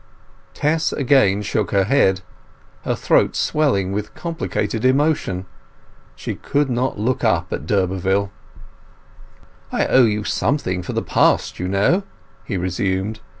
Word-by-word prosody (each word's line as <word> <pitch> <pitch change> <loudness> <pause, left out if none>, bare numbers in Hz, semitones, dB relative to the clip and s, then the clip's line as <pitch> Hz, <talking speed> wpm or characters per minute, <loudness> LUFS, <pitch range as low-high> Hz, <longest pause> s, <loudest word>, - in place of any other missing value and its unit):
Tess 155 +2 +1
again 120 -8 +3
shook 105 0 -1
her 100 -1 +2
head, 95 -5 +2 0.6
her - - 0
throat - - +2
swelling 130 -12 +1
with 105 +1 -4
complicated 165 -9 -3
emotion. 130 - +1 0.7
She - - -5
could 145 -2 -1
not 125 0 -1
look 120 +5 -1
up - - +1
at 75 - -5
d'Urberville. 95 +1 0 1.4
"I - - +1
owe 130 -2 +5
you 105 -1 0
something 100 -2 -1
for 90 - -6
the - - -1
past, - - +1
you 90 - -2
know," 100 - +2 0.4
he 100 - -3
resumed. 95 +4 -2
105 Hz, 130 wpm, -20 LUFS, 95-135 Hz, 1.4 s, owe